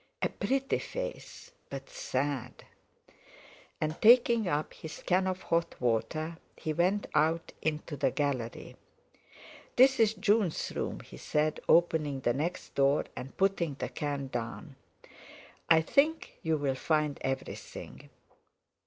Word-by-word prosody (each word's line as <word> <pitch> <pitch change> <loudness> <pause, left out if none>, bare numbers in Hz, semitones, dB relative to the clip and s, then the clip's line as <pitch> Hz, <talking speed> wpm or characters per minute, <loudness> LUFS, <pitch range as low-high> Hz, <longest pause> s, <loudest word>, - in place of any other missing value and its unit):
"A - - +3
pretty 270 0 0
face, - - -6 0.2
but - - -6
sad!" 145 - -3 1.2
And 155 0 -2
taking 235 -2 +6
up 150 -2 -1
his 160 -1 -9
can 185 +1 +2
of 185 0 -3
hot 170 0 0
water 140 +8 -1 0.2
he 155 - -2
went 185 +6 +2
out 160 +2 +2
into 155 0 -2
the 135 - +2
gallery. 130 -4 -3 1.0
"This 265 +2 +6
is 220 -1 +4
June's 205 -4 +1
room," - - -3
he - - -12
said, 150 0 0
opening 155 -5 +3
the 120 - +2
next 165 +7 -3
door 140 +1 +3
and 135 - -8
putting 185 -6 +1
the - - -4
can 145 -2 -3
down; 120 +5 -5 0.9
"I 160 -1 +7
think 300 - +1
you'll 145 -4 +1
find 150 +1 0
everything." 135 0 -5
160 Hz, 125 wpm, -30 LUFS, 140-195 Hz, 1.2 s, I